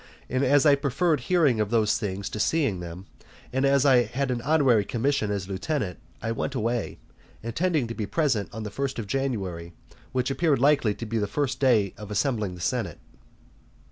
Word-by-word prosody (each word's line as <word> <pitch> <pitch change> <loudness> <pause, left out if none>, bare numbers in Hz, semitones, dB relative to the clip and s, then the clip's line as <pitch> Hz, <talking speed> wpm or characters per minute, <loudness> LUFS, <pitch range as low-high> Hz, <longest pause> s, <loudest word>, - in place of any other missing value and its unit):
And 130 +2 +1
as 140 +2 +4
I 145 - +7
preferred 145 +3 +1
hearing 145 -4 +2
of 105 -2 0
those 110 -2 +2
things 100 -1 -3
to 105 - -5
seeing 135 - +1
them, 90 +2 -8 0.5
and 130 +1 +1
as 140 0 +3
I 130 -3 +6
had 130 +1 -2
an 120 -1 -2
honorary 135 -6 +3
commission 120 +1 0
as 100 -2 -2
lieutenant, 100 - -3 0.2
I 115 - -1
went 130 +4 -3
away, 115 -1 -2 0.5
intending 155 +5 0
to 115 - -5
be 110 -3 -4
present 130 - 0
on 110 - -6
the 105 - -5
first 135 +3 -3
of 115 - -3
January, 100 -10 -3 0.4
which 130 0 0
appeared 150 0 +2
likely 135 -5 +3
to 115 - -6
be 115 +1 -2
the 105 - 0
first 130 +2 -2
day 115 -8 +3
of 105 -1 -8
assembling 105 -3 -1
the 90 - -10
senate. - - -2
120 Hz, 190 wpm, -26 LUFS, 105-140 Hz, 0.5 s, I